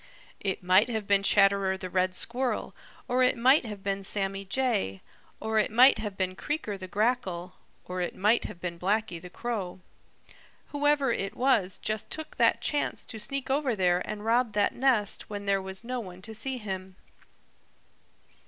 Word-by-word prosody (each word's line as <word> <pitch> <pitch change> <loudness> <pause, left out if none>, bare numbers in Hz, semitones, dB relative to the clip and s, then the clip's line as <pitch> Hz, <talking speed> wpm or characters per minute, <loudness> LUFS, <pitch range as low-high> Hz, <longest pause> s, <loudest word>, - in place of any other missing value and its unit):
It 190 -2 -3
might 185 +5 +5
leave 220 -4 -3
been 200 0 +3
Chatterer 195 -1 +3
the 185 - -6
Red 185 0 0
Squirrel, 245 +4 0 0.3
or 255 0 +1
it 255 - +3
might 260 +4 +5
have 205 -3 -7
been 195 0 -1
Sammy 195 0 -1
Jay, 190 - -1 0.4
or 220 0 0
it 215 - +2
might 245 +2 +6
have 210 -3 -5
been 185 -1 -1
Creaker 295 - -3
the 190 -1 -8
Grackle, 190 -4 -1 0.3
or 180 0 -4
it 175 - -3
might 210 +4 +2
have 175 - -7
been 170 -1 -5
Blacky 195 -2 -1
the 180 - -10
Crow. 195 -3 -4 0.9
Whoever 290 -2 +2
it 195 -3 -2
was 225 -8 +2
just 215 -1 -3
took 315 0 -6
that - - +3
chance 295 - -1
to 220 - -6
sneak 270 +5 -3
over 275 -4 +1
there 180 -2 +2
and 210 0 -6
rob 235 0 +2
that 205 -1 +2
nest 240 -6 +1
when 205 -1 -5
there 195 -1 +2
was 190 +2 -7
no 250 +1 -3
one 185 -4 -9
to 220 - -7
see 255 +4 -3
him." 190 -4 -6
205 Hz, 175 wpm, -28 LUFS, 190-245 Hz, 0.9 s, might